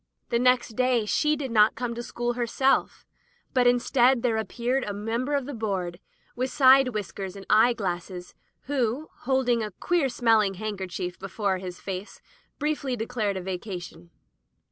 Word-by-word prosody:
The 235 Hz, -, +1 dB
next 250 Hz, 0 st, +3 dB
day 245 Hz, 0 st, +1 dB
she 300 Hz, +8 st, +2 dB
did 275 Hz, -4 st, -4 dB
not 215 Hz, -1 st, +5 dB
come 240 Hz, 0 st, -3 dB
to 235 Hz, -, -5 dB
school 240 Hz, 0 st, -3 dB
herself, 245 Hz, +3 st, 0 dB, 0.5 s
but 250 Hz, -1 st, +4 dB
instead 245 Hz, 0 st, +3 dB
there 230 Hz, -3 st, +2 dB
appeared 245 Hz, +4 st, -1 dB
a 205 Hz, -, -4 dB
member 230 Hz, +7 st, -2 dB
of 280 Hz, -3 st, -1 dB
the 285 Hz, -, -6 dB
board, 190 Hz, -6 st, -3 dB, 0.4 s
with 255 Hz, +2 st, -1 dB
side 270 Hz, -1 st, +6 dB
whiskers 200 Hz, -3 st, -5 dB
and 195 Hz, -1 st, -10 dB
eye 225 Hz, +3 st, +6 dB
glasses, 180 Hz, -4 st, -5 dB, 0.3 s
who, 265 Hz, +1 st, -2 dB
holding 250 Hz, -2 st, +1 dB
a 215 Hz, -, -3 dB
queer 295 Hz, -, 0 dB
smelling 225 Hz, -5 st, +2 dB
handkerchief 190 Hz, -3 st, -5 dB
before 195 Hz, -1 st, -2 dB
his 180 Hz, -1 st, -7 dB
face, 190 Hz, +1 st, -6 dB, 0.4 s
briefly 290 Hz, -3 st, -1 dB
declared 220 Hz, -4 st, -2 dB
a -, -, -4 dB
vacation. 180 Hz, -2 st, -6 dB
230 Hz, 155 wpm, -26 LUFS, 195-255 Hz, 0.5 s, side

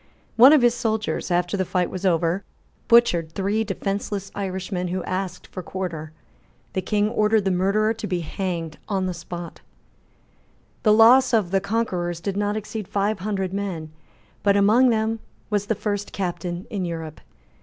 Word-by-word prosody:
One 250 Hz, +4 st, +9 dB
of 300 Hz, -5 st, +5 dB
his 240 Hz, -1 st, +5 dB
soldiers, 220 Hz, -4 st, -2 dB
after 175 Hz, +1 st, +1 dB
the 190 Hz, -, +1 dB
fight 180 Hz, -1 st, -1 dB
was 185 Hz, +1 st, -2 dB
over, 170 Hz, +2 st, +1 dB, 0.4 s
butchered 180 Hz, -9 st, +4 dB
three 200 Hz, +3 st, 0 dB
defenceless 200 Hz, -1 st, -3 dB
Irishmen 190 Hz, -2 st, -3 dB
who 180 Hz, 0 st, -3 dB
asked 185 Hz, -1 st, -4 dB
for 185 Hz, -, -7 dB
quarter. 165 Hz, -4 st, -5 dB, 0.6 s
The 190 Hz, -, 0 dB
King 205 Hz, +3 st, +1 dB
ordered 215 Hz, -1 st, +2 dB
the 190 Hz, -, +2 dB
murderer 200 Hz, +4 st, +2 dB
to 220 Hz, -1 st, -6 dB
be 180 Hz, -3 st, -1 dB
hanged 170 Hz, -1 st, -4 dB
on 195 Hz, -2 st, 0 dB
the 185 Hz, -, -2 dB
spot, 170 Hz, 0 st, -8 dB, 1.2 s
The 215 Hz, -, +4 dB
loss 240 Hz, +4 st, +6 dB
of 200 Hz, -6 st, +1 dB
the 195 Hz, 0 st, +2 dB
conquerors 185 Hz, -5 st, -1 dB
did 195 Hz, +2 st, -3 dB
not 205 Hz, +1 st, 0 dB
exceed 215 Hz, -1 st, -5 dB
five 205 Hz, +1 st, 0 dB
hundred 190 Hz, -1 st, -2 dB
men 180 Hz, -6 st, -4 dB, 0.5 s
but 200 Hz, 0 st, +3 dB
among 220 Hz, +6 st, +5 dB
them 225 Hz, 0 st, 0 dB, 0.3 s
was 205 Hz, -1 st, 0 dB
the 220 Hz, -, +1 dB
first 205 Hz, 0 st, -3 dB
captain 175 Hz, -1 st, -3 dB
in 200 Hz, -3 st, -2 dB
Europe. 165 Hz, -3 st, -5 dB
195 Hz, 165 wpm, -23 LUFS, 180-215 Hz, 1.2 s, One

